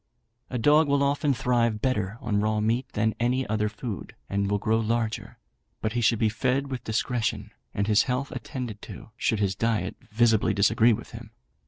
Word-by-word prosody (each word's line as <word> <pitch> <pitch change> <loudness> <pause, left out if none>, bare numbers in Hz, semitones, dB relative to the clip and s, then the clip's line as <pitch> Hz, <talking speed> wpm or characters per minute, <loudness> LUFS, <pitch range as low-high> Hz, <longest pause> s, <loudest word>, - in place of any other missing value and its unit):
A 125 - -2
dog 150 +6 +4
will 140 0 +2
often 140 +1 +1
thrive 120 -4 +1
better 105 -4 -1
on 105 -5 0
raw 110 0 +1
meat 115 +4 0
than 110 +1 +2
on - - -5
any 125 +2 +1
other 105 0 0
food, 105 -1 -7 0.2
and 100 0 0
will 100 - +2
grow 110 +2 +1
larger; 115 0 -2 0.4
but 110 - -2
he 120 - 0
should 115 +1 +3
be 110 0 +2
fed 130 +5 0
with 125 -2 -4
discretion, 115 +1 -1 0.2
and 100 - -1
his 105 -1 +4
health 125 +2 -1
attended 120 -3 -6
to, - - -10
should 110 -2 0
his 100 -2 +1
diet 110 -3 -1 0.2
visibly 110 -3 +3
disagree 110 +3 +4
with 115 +1 -3
him. 115 -1 -9
115 Hz, 190 wpm, -26 LUFS, 105-125 Hz, 0.4 s, dog